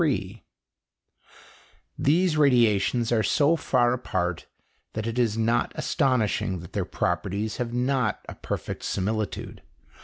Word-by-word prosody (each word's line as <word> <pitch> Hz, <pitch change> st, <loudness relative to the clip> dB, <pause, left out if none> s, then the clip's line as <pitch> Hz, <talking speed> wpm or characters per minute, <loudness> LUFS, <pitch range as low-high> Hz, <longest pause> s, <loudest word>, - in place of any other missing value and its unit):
] -, -, -9 dB
These 170 Hz, +1 st, +3 dB
radiations 120 Hz, -5 st, +3 dB
are 115 Hz, -2 st, +3 dB
so 145 Hz, +7 st, +3 dB
far 125 Hz, -6 st, +2 dB
apart 90 Hz, -8 st, -2 dB, 0.5 s
that 110 Hz, 0 st, -3 dB
it 115 Hz, +2 st, -2 dB
is 115 Hz, -3 st, +1 dB
not 115 Hz, +1 st, +1 dB
astonishing 115 Hz, -, 0 dB
that 85 Hz, -, -12 dB
their -, -, -1 dB
properties 100 Hz, +4 st, -2 dB
have 120 Hz, -2 st, -3 dB
not 125 Hz, -2 st, 0 dB
a -, -, -6 dB
perfect -, -, -5 dB
similitude. 105 Hz, +2 st, -3 dB
115 Hz, 120 wpm, -26 LUFS, 105-130 Hz, 0.5 s, These